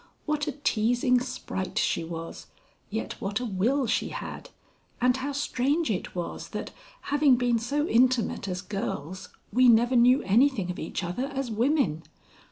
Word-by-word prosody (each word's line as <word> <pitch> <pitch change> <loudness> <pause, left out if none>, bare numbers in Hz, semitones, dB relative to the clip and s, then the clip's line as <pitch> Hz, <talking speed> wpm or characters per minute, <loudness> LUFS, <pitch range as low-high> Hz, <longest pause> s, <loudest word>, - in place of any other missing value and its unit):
What 300 -1 -1
a 295 - -1
teasing 245 -1 +2
sprite 215 -6 -5
she - - +1
was, 165 0 -7 0.4
yet 220 +2 -4
what 200 +1 -1
a 250 - -3
will 240 +7 +1
she 225 - 0
had, - - -7 0.5
and 250 0 +3
how 265 +2 -3
strange 280 +1 0
it 185 - -4
was 175 -1 -5
that, - - -5 0.4
having 290 -3 +5
been 245 -1 +1
so 290 +7 -1
intimate 245 - +2
as 180 0 -4
girls, 185 -3 -5 0.2
we 250 +2 +6
never 240 +2 +4
knew 250 +3 +5
anything 215 -2 +3
of 180 - -7
each 160 - -4
other 180 +10 -2
as 270 -3 -4
women! 225 - +1
245 Hz, 160 wpm, -27 LUFS, 195-270 Hz, 0.5 s, we